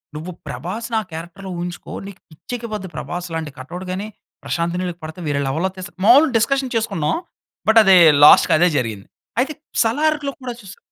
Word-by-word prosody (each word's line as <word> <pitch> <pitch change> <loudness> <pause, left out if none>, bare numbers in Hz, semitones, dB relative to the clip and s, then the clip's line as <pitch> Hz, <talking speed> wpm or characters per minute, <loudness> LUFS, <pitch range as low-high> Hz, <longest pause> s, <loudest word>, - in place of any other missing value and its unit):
"నువ్వు 160 +4 -6 0.2
ప్రభాస్‌ని 225 +6 -5
ఆ - - -8
క్యారెక్టర్‌లో 175 +4 -8
ఊహించుకో 175 0 -6 0.2
నీకు 200 0 -12
పిచ్చెక్కిపోద్ది." 215 +3 -6
ప్రభాస్ 175 0 -5
లాంటి 160 -2 -4
కటౌట్ 175 +8 -7
గాని, 195 +3 -4 0.4
ప్రశాంత్ 170 +1 -2
నీల్‌కి 175 -1 -4
పడితే 155 +3 -8
వేరే 145 -1 0
లెవెల్‌లో 160 +8 0
తీస్తాడు. 185 +1 -9
మాములుగా 275 +7 +7
డిస్కషన్ 265 +3 0
చేసుకున్నాం. 165 -9 0 0.5
బట్ 225 +1 +7
అదే 190 -2 +7 0.3
లాస్ట్‌కి 150 - +8
అదే 175 +3 +5
జరిగింది. 110 -6 -3 0.3
అయితే 275 +5 0 0.3
సలార్‌లో 295 +4 +1
కూడా 250 -1 -5
చూసా 195 -3 -12
185 Hz, 160 wpm, -20 LUFS, 165-230 Hz, 0.5 s, లాస్ట్‌కి